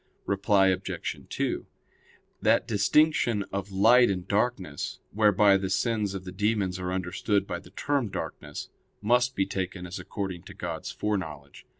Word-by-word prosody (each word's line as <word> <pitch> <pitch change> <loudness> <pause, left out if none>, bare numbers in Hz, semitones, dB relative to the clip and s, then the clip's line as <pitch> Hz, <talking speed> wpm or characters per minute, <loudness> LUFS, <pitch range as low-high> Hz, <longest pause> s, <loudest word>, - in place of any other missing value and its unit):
Reply 100 -1 +3
Obj. 95 0 -2
2: - - -2 0.8
That - - +3
distinction 115 +1 +3
of 100 0 -3
light 115 +5 +6
and 90 -2 -2
darkness, 100 -8 -1
whereby 105 -2 +5
the 95 0 -3
sins 105 -1 0
of 95 - -5
the 90 - -6
demons 100 -1 0
are 90 0 -3
understood 95 +2 0
by 85 - -4
the 90 - -15
term 135 +4 -1
darkness, 80 -5 -6 0.3
must 125 +4 +2
be 95 - +2
taken 95 -1 -4
as 90 +1 -6
according 95 -4 -5
to - - -11
God's - - -5
foreknowledge. 80 -10 -4
100 Hz, 150 wpm, -27 LUFS, 95-105 Hz, 0.8 s, light